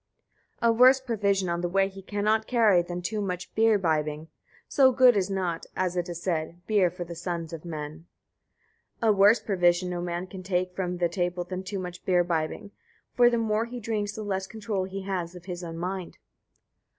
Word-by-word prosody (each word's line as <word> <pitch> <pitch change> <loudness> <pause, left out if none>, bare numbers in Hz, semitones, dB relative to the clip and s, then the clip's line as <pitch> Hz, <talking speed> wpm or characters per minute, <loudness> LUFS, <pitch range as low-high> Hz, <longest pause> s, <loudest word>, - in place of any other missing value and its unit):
11. - - +5
A - - -8
worse 260 +1 +8
provision 200 -7 0
on 170 0 -1
the 175 - -1
way 195 +2 +2
he 195 0 -10
cannot 210 +2 0
carry 220 -7 +4
than 175 +1 -6
too 210 +3 -2
much 180 -2 -4
beer 225 -1 +4
bibbing; 155 -3 -1 0.4
so 265 -2 +5
good 255 -1 +6
is 195 -1 +1
not, 180 -4 -2
as 180 -1 -1
it 175 0 -2
is 170 -1 -5
said, 170 -1 -2
beer 205 -5 +3
for 175 +1 -6
the 170 0 -8
sons 170 -1 -4
of 160 - -7
men. 155 0 -7 0.9
12. 220 -2 +4
A - - -3
worse 205 +4 +6
provision 180 -2 +1
no 175 -1 -3
man 175 +1 -3
can 185 0 -9
take 180 -1 -1
from 180 -1 -2
table 175 0 -1
than 185 +1 -5
too 195 +1 -5
much 180 -1 -6
beer 180 -2 +3
bibbing: 170 +3 -2 0.4
for 240 -1 +6
the 240 - 0
more 220 0 0
he 245 +1 -7
drinks 210 -2 -2
the 215 - -6
less 190 -2 -2
control 210 -3 -3
he 190 +1 -6
has 185 -3 -3
of 175 -1 -11
his 180 -1 -6
own 165 -1 -6
mind. 180 +1 -4
185 Hz, 205 wpm, -27 LUFS, 175-205 Hz, 0.9 s, worse